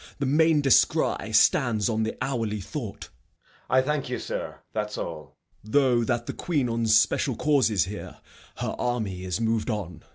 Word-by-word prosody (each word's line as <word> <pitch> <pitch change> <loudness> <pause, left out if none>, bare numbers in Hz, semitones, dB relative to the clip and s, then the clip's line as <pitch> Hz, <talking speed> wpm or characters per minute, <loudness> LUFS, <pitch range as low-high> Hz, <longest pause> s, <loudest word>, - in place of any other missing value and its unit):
The 140 - -2
main 155 +2 +3
descry 135 -3 +2
Stands 110 -4 +3
on 110 -2 0
the 110 - -2
hourly 115 -5 -2
thought. 95 - -6
Edg. - - -16 0.2
I 130 - +4
thank 150 -1 -2
you 125 - -2
sir. - - -5 0.2
That's 105 -1 -3
all. 75 -4 -7 0.3
Gent. 110 - -12
Though 130 -4 +4
that 120 -1 -1
the - - -4
Queen 145 -8 -1
on 115 0 -1
special 110 +4 +3
cause 140 -6 +2
is 100 -8 +1
here, 105 +2 -8 0.4
Her - - -3
army 110 -7 -2
is 90 -1 -2
mov'd 115 0 0
on. 90 -8 -4
115 Hz, 175 wpm, -26 LUFS, 105-130 Hz, 0.4 s, I